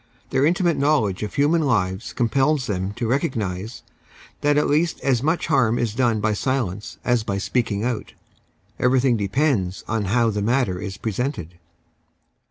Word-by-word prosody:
Their 135 +2 +3
intimate 175 0 +1
knowledge 130 -10 +1
of 105 - -5
human 150 +4 +3
lives 105 -7 0
compels 135 +3 +1
them 95 -2 -2
to 120 - -3
recognise 115 - -2 0.6
that 145 0 +2
at 150 - +3
least 160 +3 +1
as 130 -4 +1
much 160 +5 0
iiarm 120 -3 +2
is 115 -3 -1
done 115 -2 +1
by 110 +1 +1
silence 105 -4 -2
as 120 -3 +2
by 100 -2 -2
speaking 105 0 -1
out. 120 -2 -3 0.7
Everything 125 0 +3
depends 100 -3 0
on 110 -1 -1
how 115 +3 +2
the 105 0 -2
matter 110 -4 +1
is 100 -1 -6
presented. 110 - -4
120 Hz, 155 wpm, -22 LUFS, 100-135 Hz, 0.7 s, Their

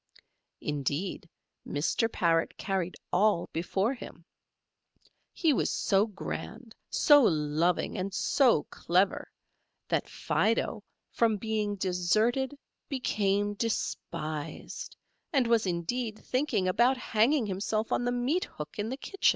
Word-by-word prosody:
Indeed, 150 +6 -3 0.3
Mr. 170 +10 0
Parrot 165 -1 +1
carried 190 -2 -2 0.2
all 200 -2 +2
before 190 +8 0
him; 170 -9 -11 1.1
he 320 -4 +2
was - - +1
so 200 +2 +2
grand, 220 +3 -7 0.2
so 290 -1 +6
loving, 160 - +1
and 190 +2 -2
so 235 - +3
clever, 185 +3 +1 0.6
that - - 0
Fido - - 0 0.3
from 225 -2 +2
being 215 -1 -1
deserted 215 +9 +1 0.3
became 205 -6 0
despised, 165 -8 -4 0.3
and 270 -6 +3
was 230 -3 +2
indeed 215 +6 -2
thinking 250 -8 0
about 240 +8 +3
hanging 250 +2 +2
himself 210 +3 -2
on - - +1
the 245 - +1
meat 250 +9 0
hook 150 +6 -9
in 210 +2 -1
the 260 - -4
kitchen. 390 +8 +1
210 Hz, 115 wpm, -29 LUFS, 180-240 Hz, 1.1 s, so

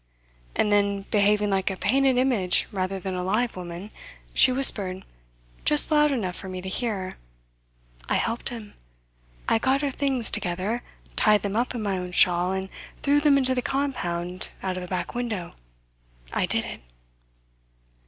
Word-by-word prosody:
And 210 - +1
then, 200 -1 +1
behaving 210 0 +2
like 190 0 +1
a 190 - -4
painted 265 +5 +2
image 240 -9 +2
rather 190 0 -2
than 190 +1 -5
a 180 0 -3
live 220 +6 0
woman, 180 +3 -8 0.4
she 260 - +5
whispered, 200 -8 +4 0.6
just 300 +1 +5
loud 300 -1 +4
enough 205 -10 -2
for 190 - -7
me 185 0 -5
to 185 - -7
hear: 195 -2 -2 1.0
"I - - +2
helped 230 +1 -1
them. 225 -4 -9 0.7
I 225 - +3
got 270 +4 +1
her 280 - 0
things 265 -4 +1
together, 190 +6 -2 0.3
tied 210 -1 +3
them 200 0 -3
up 245 +2 -1
in 230 - -3
my 195 -2 -1
own 180 0 -6
shawl, 175 +1 +4
and 190 0 -3 0.3
threw 290 +1 +3
them 290 -1 +4
into 260 -1 +3
the 250 - -1
compound 185 -11 -3
out 190 -1 -2
of 185 - -5
a 180 - -7
back 180 -1 -4
window. 225 -8 -4 0.8
I - - 0
did - - 0
it." - - -8
205 Hz, 165 wpm, -25 LUFS, 185-250 Hz, 1.0 s, she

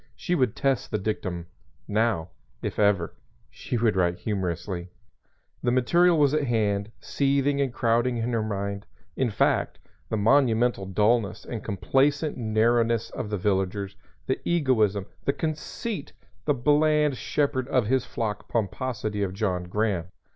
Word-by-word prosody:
She 180 - -2
would 130 -10 +2
test 135 -3 0
the 105 - 0
dictum; 95 -4 -3 0.4
now, 105 -6 +1 0.3
if - - -3
ever, 100 -5 +2 0.4
she 120 - -4
would 110 -2 +2
write 90 -1 +1
humorously. 90 -3 -3 0.7
The - - +1
material 170 +8 +4
was 145 -2 +4
at 155 -2 +1
hand, 105 -3 0
seething 140 +4 +1
and 135 -3 0
crowding 120 +1 +1
in 115 +1 -1
her 115 - +1
mind, 100 -1 -3 0.3
in 130 -2 +1
fact 100 - +1 0.3
the 110 - 0
monumental 115 -2 +3
dullness 105 +2 +1
and 115 -3 -5
complacent 140 - +1
narrowness 115 0 +1
of 115 - -5
the 105 - -1
villagers, 95 0 -1 0.3
the 130 - -1
egoism, 110 - +2 0.2
the 140 - +2
conceit, 155 - -4 0.3
the 145 - +2
bland 150 +2 +3
shepherd 130 -2 -1
of 130 -4 +2
his 130 +3 +2
flock 105 -3 -4
pomposity 110 -1 -2
of 95 -2 -1
John 95 -4 -1
Graham. 100 -2 0
115 Hz, 140 wpm, -26 LUFS, 100-135 Hz, 0.7 s, material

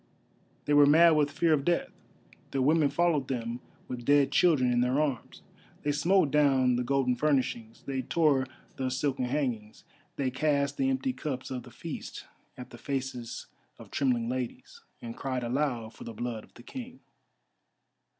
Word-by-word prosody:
They 145 - +1
were 145 -1 +7
mad 165 +3 +7
with 150 -2 +3
fear 160 +3 +2
of 140 -2 +1
death; 175 +3 0 0.6
their 135 - -1
women 150 +1 +4
followed 150 -2 +1
them 120 -2 -3 0.3
with 125 -1 -6
dead 140 +1 +4
children 145 -9 +4
in 120 - +2
their 125 +3 +1
arms. 140 -6 -3 0.4
They 145 - +1
smote 165 +2 +2
down 135 -4 +3
the 125 - 0
golden 130 -1 +1
furnishings, 125 -5 -1
they 135 -1 -2
tore 140 -2 +2 0.3
the 130 -1 -1
silken 130 0 -1
hangings, 125 -6 -3 0.3
they 135 -2 -1
cast 140 0 0
the 270 - +1
empty 265 -1 -1
cups 135 - -5
of 125 -1 -3
the 125 - -13
feast - - -7 0.3
at 125 0 -9
the 120 - -11
faces 130 -3 -4 0.3
of - - -13
trembling 125 -4 +1
ladies, 125 -1 -5 0.2
and 115 0 -6
cried 130 -2 -3
aloud 120 -3 -1
for - - -11
the 115 - -7
blood 120 -2 -4
of - - -29
the 120 - -13
King. 255 - -9
135 Hz, 170 wpm, -29 LUFS, 125-150 Hz, 0.6 s, were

